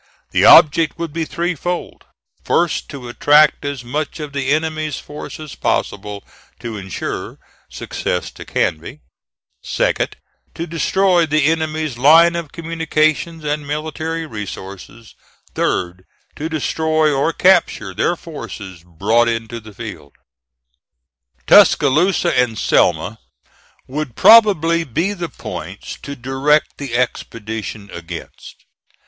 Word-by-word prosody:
The -, -, +3 dB
object 160 Hz, 0 st, +6 dB
would 165 Hz, -3 st, -5 dB
be 165 Hz, 0 st, -2 dB
threefold: 175 Hz, +1 st, -4 dB, 0.4 s
first, 170 Hz, -2 st, 0 dB
to 135 Hz, -4 st, -8 dB
attract 150 Hz, +4 st, +4 dB
as 140 Hz, -3 st, -4 dB
much 145 Hz, +7 st, -4 dB
of 150 Hz, -2 st, -6 dB
the 135 Hz, -1 st, -2 dB
enemy's 155 Hz, -1 st, -1 dB
force 150 Hz, +1 st, -9 dB
as 155 Hz, -2 st, -8 dB
possible, 105 Hz, 0 st, -2 dB, 0.4 s
to 120 Hz, -2 st, -6 dB
insure 95 Hz, -2 st, -5 dB, 0.3 s
success 90 Hz, -, -4 dB
to -, -, -11 dB
Canby; 80 Hz, -, -2 dB, 0.6 s
second, -, -, -1 dB, 0.4 s
to 170 Hz, -, -4 dB
destroy 175 Hz, +1 st, +2 dB
the 155 Hz, -1 st, +2 dB
enemy's 155 Hz, -4 st, -1 dB
line 165 Hz, +5 st, +6 dB
of 170 Hz, -4 st, -5 dB
communications 160 Hz, -1 st, -1 dB
and 150 Hz, -1 st, -3 dB
military 160 Hz, +2 st, -3 dB
resources; 105 Hz, -, -9 dB, 0.4 s
third, 90 Hz, 0 st, -1 dB, 0.3 s
to 155 Hz, +2 st, -4 dB
destroy 155 Hz, 0 st, +1 dB
or 140 Hz, +4 st, +1 dB
capture 165 Hz, -, +2 dB
their 175 Hz, -, 0 dB
forces 105 Hz, -, -9 dB
brought 105 Hz, +8 st, +1 dB
into 115 Hz, 0 st, -3 dB
the 110 Hz, -1 st, -13 dB
field. 70 Hz, -7 st, -9 dB, 1.3 s
Tuscaloosa 170 Hz, +4 st, +4 dB
and 120 Hz, -3 st, +1 dB
Selma 90 Hz, +4 st, +1 dB, 0.7 s
would 135 Hz, -3 st, -5 dB
probably 170 Hz, -7 st, +6 dB
be 165 Hz, -, -1 dB
the 175 Hz, -4 st, -5 dB
points -, -, -8 dB
to 140 Hz, -, -7 dB
direct 135 Hz, +4 st, 0 dB
the 135 Hz, -5 st, -4 dB
expedition 110 Hz, -4 st, -4 dB
against. 85 Hz, 0 st, -10 dB
150 Hz, 115 wpm, -18 LUFS, 115-160 Hz, 1.3 s, object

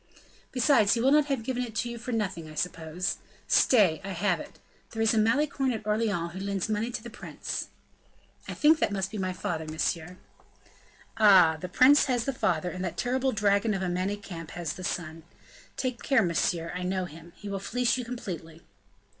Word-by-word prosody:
"Besides 245 Hz, -5 st, +4 dB
he -, -, -1 dB
will 260 Hz, +4 st, +3 dB
not 300 Hz, 0 st, +4 dB
have 270 Hz, -5 st, -1 dB
given 250 Hz, 0 st, -2 dB
it 225 Hz, -3 st, -7 dB
to 240 Hz, -, -1 dB
you 235 Hz, -, -7 dB
for 245 Hz, +2 st, -5 dB
nothing, 190 Hz, -8 st, -2 dB
I 155 Hz, -, -11 dB
suppose. 165 Hz, +2 st, -2 dB, 0.3 s
Stay, 195 Hz, -10 st, +4 dB
I 195 Hz, 0 st, -5 dB
have 180 Hz, -1 st, +1 dB
it; -, -, -10 dB, 0.3 s
there 225 Hz, -, -4 dB
is 225 Hz, -, +3 dB
a -, -, +1 dB
Malicorne 270 Hz, +4 st, +2 dB
at 215 Hz, -2 st, -6 dB
Orleans 210 Hz, -6 st, 0 dB
who 190 Hz, -, -6 dB
lends 195 Hz, -1 st, -2 dB
money 220 Hz, +2 st, -1 dB
to 230 Hz, -, -5 dB
the 235 Hz, -, -8 dB
prince." -, -, -5 dB, 0.8 s
"I -, -, -5 dB
think 310 Hz, +1 st, +5 dB
that -, -, +1 dB
must 195 Hz, -1 st, -2 dB
be 215 Hz, -, -5 dB
my 185 Hz, -1 st, -1 dB
father, 165 Hz, -3 st, -3 dB
monsieur." 160 Hz, +2 st, -2 dB, 1.0 s
"Ah! 190 Hz, -7 st, +7 dB
the 180 Hz, -, -5 dB
prince 265 Hz, -, +6 dB
has 245 Hz, -3 st, 0 dB
the 275 Hz, -, -1 dB
father, 180 Hz, -6 st, 0 dB
and 185 Hz, 0 st, -5 dB
that 175 Hz, -2 st, -4 dB
terrible 260 Hz, +2 st, 0 dB
dragon 210 Hz, 0 st, +2 dB
of 190 Hz, -, -2 dB
a 180 Hz, -, -1 dB
Manicamp 180 Hz, -2 st, -4 dB
has 170 Hz, -3 st, -3 dB
the 185 Hz, -, -9 dB
son. 165 Hz, -3 st, -4 dB, 0.6 s
Take 255 Hz, -3 st, -2 dB
care, 270 Hz, -5 st, +3 dB
monsieur, 170 Hz, -1 st, 0 dB
I 180 Hz, -, -4 dB
know 185 Hz, 0 st, -1 dB
him. 165 Hz, +1 st, -12 dB
He 205 Hz, -, -10 dB
will 200 Hz, -1 st, -3 dB
fleece 245 Hz, +4 st, 0 dB
you 255 Hz, -, -3 dB
completely." 175 Hz, -9 st, -7 dB
200 Hz, 200 wpm, -28 LUFS, 175-235 Hz, 1.0 s, Ah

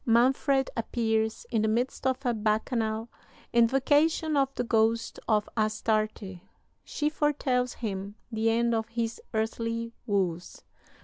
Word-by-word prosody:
Manfred 265 Hz, +3 st, +3 dB
appears 220 Hz, -1 st, -1 dB
in 225 Hz, -2 st, +2 dB
the 220 Hz, -, +2 dB
midst 245 Hz, +4 st, 0 dB
of 260 Hz, +1 st, -1 dB
a 245 Hz, -, +2 dB
bacchanal. 220 Hz, +1 st, 0 dB, 0.5 s
Invocation 290 Hz, +6 st, +3 dB
of 275 Hz, -1 st, +2 dB
the -, -, -1 dB
ghost 230 Hz, 0 st, +1 dB
of 210 Hz, -1 st, +2 dB
Astarte. 215 Hz, -3 st, -1 dB, 0.4 s
She 300 Hz, -, -2 dB
foretells 275 Hz, -5 st, 0 dB
him 200 Hz, -2 st, -4 dB, 0.2 s
the 225 Hz, 0 st, +1 dB
end 235 Hz, +1 st, +2 dB
of 225 Hz, -1 st, 0 dB
his 230 Hz, 0 st, -3 dB
earthly 230 Hz, +1 st, -2 dB
woes. 180 Hz, -4 st, -1 dB
230 Hz, 125 wpm, -28 LUFS, 220-250 Hz, 0.5 s, Manfred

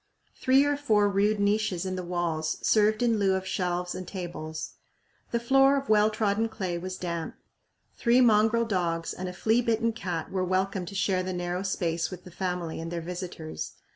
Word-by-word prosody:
Three 265 Hz, +1 st, +4 dB
or 290 Hz, 0 st, +1 dB
four 215 Hz, -8 st, +3 dB
rude 205 Hz, +1 st, +2 dB
niches 200 Hz, -3 st, +1 dB
in 185 Hz, 0 st, -2 dB
the 185 Hz, -, -3 dB
walls 175 Hz, -3 st, -2 dB
served 215 Hz, +2 st, +3 dB
in 230 Hz, -3 st, +2 dB
lieu 195 Hz, -1 st, +3 dB
of 190 Hz, 0 st, -3 dB
shelves 180 Hz, -1 st, -1 dB
and 185 Hz, -, -6 dB
tables. 170 Hz, -4 st, -6 dB, 0.6 s
The 235 Hz, -, 0 dB
floor 270 Hz, +3 st, +4 dB
of 275 Hz, 0 st, -4 dB
well 210 Hz, 0 st, +5 dB
trodden 215 Hz, +1 st, 0 dB
clay 190 Hz, -6 st, -3 dB
was 185 Hz, +1 st, -5 dB
damp. 170 Hz, -2 st, -4 dB, 0.6 s
Three 235 Hz, +1 st, +3 dB
mongrel 225 Hz, -1 st, +4 dB
dogs 170 Hz, -5 st, -1 dB
and 185 Hz, 0 st, -5 dB
a -, -, -7 dB
flea 225 Hz, +6 st, +2 dB
bitten 230 Hz, -1 st, +1 dB
cat 175 Hz, -7 st, -4 dB
were 185 Hz, -1 st, 0 dB
welcome 185 Hz, 0 st, -1 dB
to 200 Hz, -, -7 dB
share 190 Hz, -1 st, +1 dB
the 185 Hz, 0 st, -3 dB
narrow 175 Hz, 0 st, -2 dB
space 170 Hz, -4 st, -1 dB
with 180 Hz, -2 st, -9 dB
the 180 Hz, -, -12 dB
family 180 Hz, -2 st, -3 dB
and 165 Hz, +1 st, -5 dB
their 170 Hz, -, -2 dB
visitors. 175 Hz, -2 st, -6 dB
190 Hz, 190 wpm, -27 LUFS, 175-220 Hz, 0.6 s, well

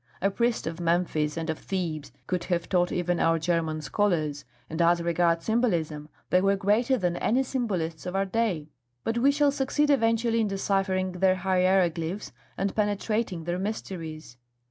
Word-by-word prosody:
A 195 Hz, +2 st, +1 dB
priest 235 Hz, +2 st, 0 dB
of 165 Hz, +1 st, -4 dB
Memphis 165 Hz, -3 st, 0 dB
and 165 Hz, 0 st, -3 dB
of 160 Hz, -1 st, -2 dB
Thebes 165 Hz, -6 st, -3 dB
could 180 Hz, -1 st, -2 dB
have 175 Hz, -2 st, -1 dB
taught 175 Hz, -2 st, +2 dB
even 175 Hz, 0 st, 0 dB
our 165 Hz, 0 st, +3 dB
German 160 Hz, -1 st, -1 dB
scholars; 155 Hz, -3 st, 0 dB, 0.2 s
and 160 Hz, +2 st, -3 dB
as 170 Hz, +1 st, +4 dB
regards 170 Hz, 0 st, +1 dB
symbolism, 170 Hz, -10 st, 0 dB, 0.2 s
they 180 Hz, -, +5 dB
were 195 Hz, +1 st, +3 dB
greater 215 Hz, +7 st, +2 dB
than 175 Hz, -5 st, -1 dB
any 255 Hz, +4 st, +2 dB
symbolists 185 Hz, -, -2 dB
of 180 Hz, -, -4 dB
our 195 Hz, 0 st, +2 dB
day. 190 Hz, -7 st, -1 dB, 0.3 s
But 230 Hz, +1 st, -1 dB
we 270 Hz, +4 st, +5 dB
shall 285 Hz, 0 st, +3 dB
succeed 290 Hz, +2 st, +1 dB
eventually 230 Hz, -3 st, +2 dB
in 215 Hz, -, +1 dB
deciphering 195 Hz, -1 st, 0 dB
their 185 Hz, +1 st, +2 dB
hieroglyphs 185 Hz, -1 st, +1 dB, 0.3 s
and 195 Hz, +1 st, -1 dB
penetrating 210 Hz, -3 st, -1 dB
their 175 Hz, +2 st, -2 dB
mysteries. 165 Hz, -, -5 dB
185 Hz, 165 wpm, -27 LUFS, 165-210 Hz, 0.3 s, they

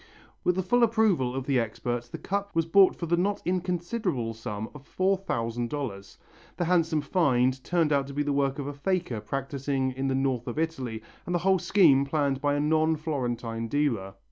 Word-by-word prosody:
With 180 Hz, -, +2 dB
the 190 Hz, -, 0 dB
full 245 Hz, +7 st, +2 dB
approval 215 Hz, -, +2 dB
of 135 Hz, -1 st, -3 dB
the 135 Hz, -3 st, +2 dB
experts 120 Hz, +1 st, -3 dB
the -, -, -6 dB
cup 200 Hz, -1 st, -3 dB
was 165 Hz, -1 st, +2 dB
bought 190 Hz, +3 st, +5 dB
for 170 Hz, -, -4 dB
the 170 Hz, +1 st, +2 dB
not 200 Hz, +3 st, 0 dB
inconsiderable 180 Hz, -, -1 dB
sum 110 Hz, -1 st, -5 dB
of 145 Hz, -2 st, -11 dB
four 190 Hz, +1 st, +1 dB
thousand 120 Hz, -10 st, -3 dB
dollars. 115 Hz, -9 st, -5 dB, 0.4 s
The 175 Hz, -, 0 dB
handsome 165 Hz, -3 st, +2 dB
find 130 Hz, -5 st, +2 dB
turned 165 Hz, -4 st, +1 dB
out 140 Hz, -1 st, +1 dB
to 140 Hz, -, -8 dB
be 145 Hz, -, +1 dB
the 145 Hz, -1 st, 0 dB
work 140 Hz, 0 st, +1 dB
of 140 Hz, -, -4 dB
a 145 Hz, -, -4 dB
faker 155 Hz, -, -1 dB
practising 135 Hz, 0 st, -2 dB
in 135 Hz, +1 st, -3 dB
the 135 Hz, -, +1 dB
North 130 Hz, -3 st, 0 dB
of 120 Hz, -, -4 dB
Italy 130 Hz, -9 st, -2 dB, 0.2 s
and 175 Hz, -, -1 dB
the 175 Hz, +1 st, -1 dB
whole 190 Hz, -1 st, +4 dB
scheme 155 Hz, -11 st, +5 dB
planned 140 Hz, -2 st, 0 dB
by 145 Hz, 0 st, +1 dB
a -, -, 0 dB
non 155 Hz, +2 st, +2 dB
Florentine 120 Hz, -7 st, -3 dB
dealer. 115 Hz, -9 st, -1 dB
145 Hz, 200 wpm, -27 LUFS, 125-175 Hz, 0.4 s, bought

